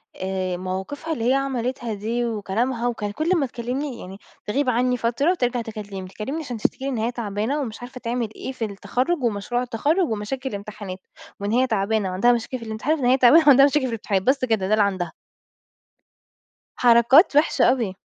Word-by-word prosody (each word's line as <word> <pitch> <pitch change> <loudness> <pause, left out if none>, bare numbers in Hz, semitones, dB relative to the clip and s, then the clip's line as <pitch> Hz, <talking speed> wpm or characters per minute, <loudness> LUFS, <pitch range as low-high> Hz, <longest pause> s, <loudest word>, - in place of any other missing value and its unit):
آآ، 185 -1 -3
مواقفها 190 - -4
اللي 235 -5 -1
هي - - +4
عملتها 255 -3 -2
دي 225 +4 -2
وكلامها 230 +3 -1
وكانت 210 -4 -3
كل 315 +2 -1
ما 290 - +1
تكلمني، 250 +2 -4
يعني 190 +1 -9 0.3
تغيب 260 +5 0
عنّي 250 +1 +1
فترة 240 +8 +1
وترجع 245 -8 0
تكلمني، 205 -4 -7
تكلمني 240 +12 -5
عشان 250 -5 -5
تشتكي 250 +4 -1
لي - - -1
إن 260 - -2
هي 225 +2 0
تعبانة 225 +4 -2
ومش 225 -5 -6
عارفة 255 +1 -9
تعمل 235 -1 -2
إيه - - -5
في 250 -4 -3
التخرج 250 - -2
ومشروع 235 +2 -1
التخرج 290 - +1
ومشاكل 230 +5 -3
الإمتحانات، 200 -3 -7 0.4
وإن 200 +1 -2
هي 255 +3 +3
تعبانة 215 -2 0
وعندها 190 +7 +3
مشاكل 240 +2 -2
في 230 - -9
الامتحان 220 +7 -1
وإن 255 - -1
هي 255 +2 +4
تعبانة 270 +6 +7
وعندها 275 -1 +8
مشاكل 285 +1 +3
في - - -1
الامتحانات، 210 -5 -1
بس 265 +2 +2
كده 220 -6 0
ده 210 - +1
اللي 215 -1 +4
عندها. 185 -4 -1 1.7
حركات 245 - +6
وحشة 295 +2 +4
أوي. 230 -7 -1
235 Hz, 185 wpm, -23 LUFS, 210-260 Hz, 1.7 s, وعندها